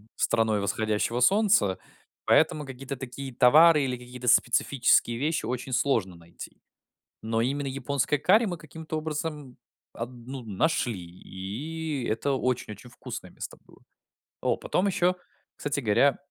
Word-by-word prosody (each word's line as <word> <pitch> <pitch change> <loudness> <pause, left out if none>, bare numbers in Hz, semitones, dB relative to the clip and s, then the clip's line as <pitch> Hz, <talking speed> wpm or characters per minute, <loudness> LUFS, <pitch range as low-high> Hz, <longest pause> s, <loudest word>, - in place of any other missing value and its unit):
страной 110 -2 +1
восходящего 110 +3 -1
солнца. 195 - +3 0.5
Поэтому 150 -1 +3
какие-то 135 0 -7
такие 135 +1 -7
товары 150 +5 +6
или 125 -2 -2
какие-то 125 0 -9
специфические 120 -1 +3
вещи 155 +4 -1
очень 125 +2 -4
сложно 115 -9 +1
найти. 85 0 -12 0.6
Но 115 +1 -1
именно 140 +4 -1
японское 140 +1 -1
карри 205 - +4
мы 180 -4 -3
каким-то 160 0 -7
образом 150 -4 -5 0.4
аб 115 +1 -5
ну, 125 +1 -9
нашли. 115 - 0
И 120 - -6
это 115 +6 -1
очень-очень 125 -4 -2
вкусное 120 - -8
место - - -8
было. - - -20 0.6
О, - - +1
потом 195 +3 0
еще, 180 -1 +2 0.4
кстати 145 -1 -2
говоря, 125 +5 +3
130 Hz, 130 wpm, -27 LUFS, 115-150 Hz, 0.6 s, товары